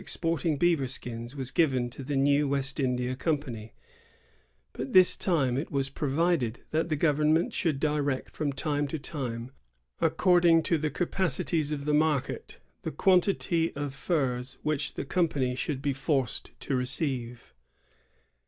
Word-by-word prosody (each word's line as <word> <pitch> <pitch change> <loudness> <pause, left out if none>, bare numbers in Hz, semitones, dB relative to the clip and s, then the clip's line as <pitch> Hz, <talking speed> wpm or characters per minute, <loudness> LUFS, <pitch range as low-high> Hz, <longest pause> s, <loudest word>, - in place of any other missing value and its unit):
109 - - -11
exporting 165 -2 0
beaver 165 -4 +2
skins 120 0 -5
was 135 -2 -4
given 130 -7 +2
to 120 +3 -8
the 140 +2 -3
new 140 +2 +3
West 140 +1 -2
India 125 -1 0
Company; 130 -7 -3 1.0
but 130 +2 -5
this 185 -1 +7
time 135 -9 +1
it 150 - -5
was 135 -2 -1
provided 145 -4 0
that 160 +2 0
the 155 - +1
government 155 +2 +2
should 155 -5 0
direct 145 -3 -1
from 150 -2 -1
time 145 +1 -1
to 160 - -3
time, 125 -5 -5 0.5
according 175 -3 +4
to 165 - +1
the 155 0 0
capacities 165 -3 -1
of 140 -2 -3
the 150 - +1
market, 150 -3 0 0.2
the - - -3
quan 185 +5 +4
tity 170 -3 0
of 145 -1 -3
furs 135 -4 -1
which 150 -1 -1
the - - -4
company 140 -6 +1
should 135 +2 -3
be 140 -1 +1
forced 135 -2 -1
to 135 - -1
receive. 125 -2 -3
145 Hz, 155 wpm, -28 LUFS, 130-160 Hz, 1.0 s, this